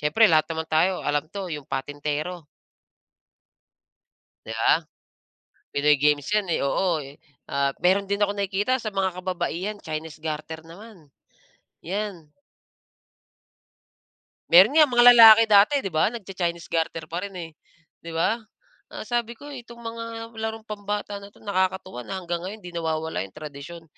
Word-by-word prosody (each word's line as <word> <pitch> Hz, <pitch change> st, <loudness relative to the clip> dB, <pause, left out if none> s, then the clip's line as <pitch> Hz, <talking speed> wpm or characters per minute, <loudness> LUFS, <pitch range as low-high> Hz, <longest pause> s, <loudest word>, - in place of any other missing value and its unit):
siyempre 190 Hz, +9 st, +4 dB
lahat 155 Hz, -2 st, +4 dB
naman 160 Hz, 0 st, -4 dB
tayo 175 Hz, +4 st, +2 dB
alam 145 Hz, +1 st, -1 dB
'to, 195 Hz, -2 st, -5 dB
yung 150 Hz, -2 st, -6 dB
patintero. 145 Hz, +5 st, -4 dB, 2.0 s
'Di 110 Hz, -, -6 dB
ba? -, -, +5 dB, 1.0 s
Pinoy 150 Hz, +1 st, +3 dB
games 150 Hz, -1 st, +2 dB
'yan, 210 Hz, -2 st, +2 dB
eh, -, -, +1 dB
oo. 170 Hz, +2 st, +1 dB
Eh, 140 Hz, 0 st, -10 dB, 0.4 s
ah, 140 Hz, 0 st, +2 dB
meron 195 Hz, +2 st, +3 dB
din 200 Hz, -, 0 dB
akong 205 Hz, 0 st, +1 dB
nakikita 200 Hz, +5 st, 0 dB
sa 225 Hz, -4 st, -4 dB
mga 190 Hz, -2 st, -1 dB
kababaihan, 185 Hz, +2 st, -3 dB
Chinese 155 Hz, -1 st, -6 dB
garter 155 Hz, +1 st, -5 dB
naman, 180 Hz, -1 st, -14 dB, 0.7 s
'yan. 190 Hz, -3 st, -5 dB, 2.2 s
Meron 185 Hz, +8 st, +7 dB
nga 305 Hz, -2 st, +8 dB
mga 240 Hz, -1 st, +4 dB
lalaki 225 Hz, -2 st, +9 dB
dati, 205 Hz, +5 st, +6 dB
'di 195 Hz, -, -4 dB
ba, 155 Hz, 0 st, +2 dB
nagcha-Chinese 180 Hz, -6 st, -4 dB
garter 165 Hz, -1 st, -1 dB
pa 170 Hz, -, -3 dB
rin, 200 Hz, -, -9 dB
eh, 170 Hz, -2 st, -7 dB, 0.5 s
'di 165 Hz, 0 st, -9 dB
ba? 215 Hz, +8 st, +1 dB, 0.5 s
Ang -, -, -8 dB
sabi 235 Hz, 0 st, -2 dB
ko, -, -, -13 dB
eh, 255 Hz, -, -7 dB
"itong 235 Hz, 0 st, -14 dB
mga 230 Hz, 0 st, -5 dB, 0.4 s
larong 220 Hz, 0 st, -4 dB
pambata 205 Hz, -1 st, -4 dB
na 200 Hz, -, -11 dB
'to, 205 Hz, -, -22 dB
nakakatuwa 190 Hz, -, -1 dB
na 190 Hz, +9 st, -6 dB
hanggang 175 Hz, -2 st, -4 dB
ngayon 190 Hz, +4 st, -6 dB
'di 175 Hz, -1 st, -9 dB
nawawala 160 Hz, -1 st, -2 dB
'yong 95 Hz, -, -9 dB
tradisyon, 150 Hz, +3 st, -9 dB
180 Hz, 150 wpm, -24 LUFS, 160-205 Hz, 2.2 s, lalaki